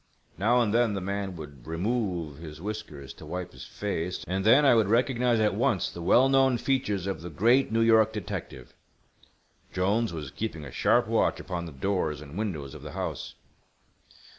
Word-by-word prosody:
Now 120 +6 +3
and 110 -3 +1
then 115 -3 +2
the - - -1
man 100 0 -3
would 75 -5 -11
remove 85 - -2
his 75 -2 -9
whiskers 80 -9 -6
to - - -13
wipe 90 +2 -5
his 65 - -11
face, 90 -4 -4
and 95 +1 -1
then 130 +8 +6
I 135 - +7
would 110 -4 +3
recognize 120 +1 +2
at 105 -1 +2
once - - +1
the 85 - -8
well 125 +9 +5
known 135 -2 +4
features 110 -8 -1
of 95 -3 -3
the 85 - -7
great 115 - +3
New 115 +1 +2
York 110 -1 +5
detective. 105 -5 -6 1.0
Jolnes 100 +4 +1
was 75 -5 -6
keeping 80 -9 -5
a 70 - -8
sharp - - +3
watch - - +1
upon 85 -2 -5
the - - -8
doors 75 0 -1
and 75 +1 -11
windows 80 -10 -4
of 75 - -10
the 75 0 -8
house. - - -5
100 Hz, 185 wpm, -27 LUFS, 80-115 Hz, 1.0 s, I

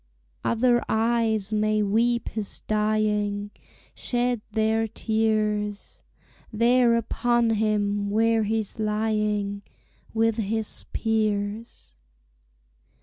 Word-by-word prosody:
Other 240 +1 +2
eyes 220 -2 +1
may 215 0 +2
weep 235 +4 +1
his 215 -2 -4
dying, 210 -1 0 0.4
Shed 245 -2 -1
their 220 +1 +1
tears 215 -2 -1 0.5
There 235 +1 +4
upon 235 0 +1
him, 205 -2 0
where 225 +2 +2
he's 220 0 -2
lying 210 -1 -1 0.5
With 225 0 +1
his 220 0 -3
peers. 215 - -2
220 Hz, 85 wpm, -25 LUFS, 210-225 Hz, 0.5 s, There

